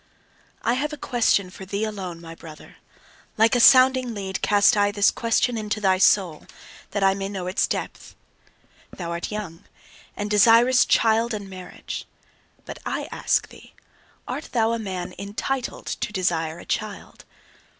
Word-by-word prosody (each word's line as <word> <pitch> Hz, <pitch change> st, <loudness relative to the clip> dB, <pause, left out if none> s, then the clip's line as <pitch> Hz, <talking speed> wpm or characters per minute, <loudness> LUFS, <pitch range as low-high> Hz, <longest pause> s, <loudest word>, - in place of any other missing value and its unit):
I 235 Hz, -, +2 dB
have 290 Hz, +4 st, -2 dB
a 300 Hz, -, -6 dB
question 225 Hz, -8 st, +1 dB
for 190 Hz, -, -10 dB
thee 200 Hz, +3 st, -3 dB
alone, 190 Hz, -6 st, -5 dB
my 165 Hz, -1 st, -10 dB
brother: 160 Hz, -2 st, -13 dB, 0.6 s
like 225 Hz, +1 st, +4 dB
a -, -, +3 dB
sounding 255 Hz, -1 st, +6 dB
lead, 190 Hz, -1 st, -4 dB
cast 205 Hz, +3 st, +4 dB
I 205 Hz, -1 st, +3 dB
this 205 Hz, 0 st, +3 dB
question 230 Hz, 0 st, 0 dB
into 215 Hz, 0 st, -3 dB
thy 190 Hz, -2 st, +2 dB
soul, 185 Hz, -5 st, +2 dB, 0.4 s
that 205 Hz, -1 st, -2 dB
I 195 Hz, 0 st, +4 dB
may 195 Hz, 0 st, -4 dB
know 190 Hz, -3 st, -5 dB
its 185 Hz, +1 st, 0 dB
depth. -, -, -5 dB, 0.7 s
Thou 170 Hz, -2 st, -7 dB
art 170 Hz, +4 st, -4 dB
young, 195 Hz, -6 st, -6 dB, 0.5 s
and 205 Hz, -, -3 dB
desirest 230 Hz, +5 st, +5 dB
child 225 Hz, 0 st, +2 dB
and 205 Hz, -2 st, -7 dB
marriage. 185 Hz, -1 st, -8 dB, 0.6 s
But -, -, -8 dB
I -, -, -4 dB
ask -, -, 0 dB
thee: -, -, -16 dB, 0.5 s
Art -, -, -5 dB
thou 225 Hz, -2 st, +2 dB
a 230 Hz, -, -1 dB
man 185 Hz, -4 st, -5 dB
ENTITLED 225 Hz, +6 st, -4 dB
to -, -, -4 dB
desire 170 Hz, -5 st, -1 dB
a -, -, -12 dB
child? 215 Hz, -2 st, -5 dB
205 Hz, 160 wpm, -23 LUFS, 185-230 Hz, 0.7 s, sounding